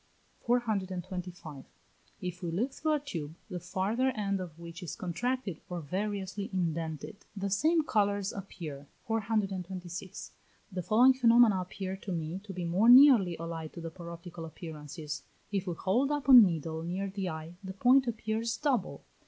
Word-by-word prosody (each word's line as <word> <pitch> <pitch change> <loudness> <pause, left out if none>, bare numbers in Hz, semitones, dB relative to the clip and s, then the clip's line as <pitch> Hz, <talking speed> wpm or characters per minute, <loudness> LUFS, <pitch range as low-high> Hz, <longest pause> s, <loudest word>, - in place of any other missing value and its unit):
425. 185 - -2 0.6
If 180 -1 -5
we 175 - -3
look 225 +11 -1
through 310 0 0
a 300 - +2
tube, 165 - -6 0.2
the 180 - -3
farther 195 +9 0
end 200 -2 -1
of 170 -4 -7
which 170 +1 -9
is 175 - -5
contracted 200 - -2
or 175 -1 -3
variously 195 +4 -3
indented, 165 -1 -2 0.2
the 195 0 -2
same 315 - +3
colours 205 -5 +1
appear. 155 -8 -7 0.2
426. 190 -5 -3 0.4
The 185 -1 -3
following 240 +8 +5
phenomena 235 -5 +5
appear 190 +1 -5
to 195 - -7
me 165 +1 -3
to 205 - -7
be 180 -2 -4
more 190 +7 +3
nearly 245 - +8
allied 165 -1 -5
to 170 - -8
the 165 0 -5
paroptical 170 0 -9
appearances. 155 -1 -7 0.3
If 195 -2 -1
we 175 - -2
hold 245 - +1
up 290 -2 -2
a 270 - +8
needle 165 - +6
near 180 +4 -3
the 190 -2 -3
eye, 160 +1 -6
the 190 0 -6
point 255 +6 +4
appears 225 0 -2
double. 280 -5 -1
190 Hz, 155 wpm, -31 LUFS, 170-220 Hz, 0.6 s, nearly